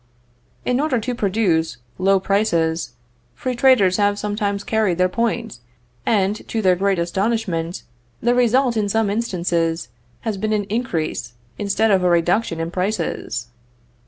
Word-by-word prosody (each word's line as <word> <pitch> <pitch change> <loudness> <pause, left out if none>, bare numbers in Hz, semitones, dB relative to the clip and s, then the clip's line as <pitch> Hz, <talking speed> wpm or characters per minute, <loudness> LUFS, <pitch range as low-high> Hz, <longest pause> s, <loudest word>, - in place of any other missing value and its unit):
In 250 +1 +1
order 290 -3 +1
to 245 +3 -3
produce 190 -7 +1 0.2
low 195 +1 +4
prices, 175 -5 0 0.4
free 255 - -3
traders 240 -8 +4
have 205 -1 +2
sometimes 205 -1 -2
carried 215 -6 +1
their 185 0 +4
point, 230 - -2 0.5
and, 200 -2 +2
to 225 - -2
their 185 -4 +4
great 195 +1 +1
astonishment, 175 -1 -1 0.4
the 240 +1 +2
result 245 +1 +3
in 210 -2 0
some 220 -1 +1
instances 170 - -1 0.3
has 215 -3 -2
been 215 +2 -1
an 210 -1 +1
increase 180 - -2 0.3
instead 210 +2 +1
of 190 -2 +3
a 180 - +3
reduction 175 +1 +1
in 165 +1 -3
prices. 180 - -2
200 Hz, 140 wpm, -21 LUFS, 175-225 Hz, 0.5 s, low